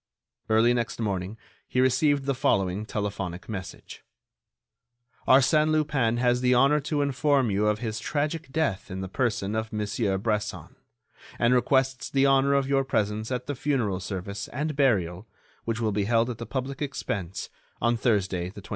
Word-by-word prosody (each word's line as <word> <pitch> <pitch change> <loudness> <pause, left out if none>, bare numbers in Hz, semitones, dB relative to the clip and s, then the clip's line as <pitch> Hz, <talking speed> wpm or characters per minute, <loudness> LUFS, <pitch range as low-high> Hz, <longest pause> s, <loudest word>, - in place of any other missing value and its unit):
Early 110 +2 +4
next 120 -1 -2
morning 100 -1 -2 0.3
he 125 - -1
received 135 +2 +3
the 140 - +1
following 100 -4 0
telephonic 100 -4 -4
message: 100 -5 -8 1.2
"Arsène 150 +4 +5
Lupin 145 -7 +1
has 125 0 +2
the 125 0 +3
honor 140 +4 +4
to 145 0 -1
inform 140 -3 +2
you 105 +2 +1
of 105 0 +2
his 110 -1 -4
tragic 150 +2 -2
death 140 -11 -1
in 95 +1 -5
the 95 - -4
person 110 -2 -1
of 110 0 -2
Monsieur 105 -1 -1
Bresson, 105 +1 -3 0.6
and 120 +1 +3
requests 130 0 +1
the 135 0 +2
honor 135 0 +4
of 140 -1 +1
your 135 0 +2
presence 110 -2 -1
at 125 -1 -2
the 145 - -3
funeral 120 -9 -1
service 100 +2 -5
and 150 +1 -3
burial, 105 - +1 0.4
which 115 0 -2
will 110 -2 0
be 100 0 0
held 115 +2 +2
at 115 - -8
the 115 - -6
public 135 +1 -4
expense 100 - -4 0.3
on 120 +1 +2
Thursday, 100 -7 0
25 100 - -15
June." 100 - -11
120 Hz, 165 wpm, -26 LUFS, 105-135 Hz, 1.2 s, Arsène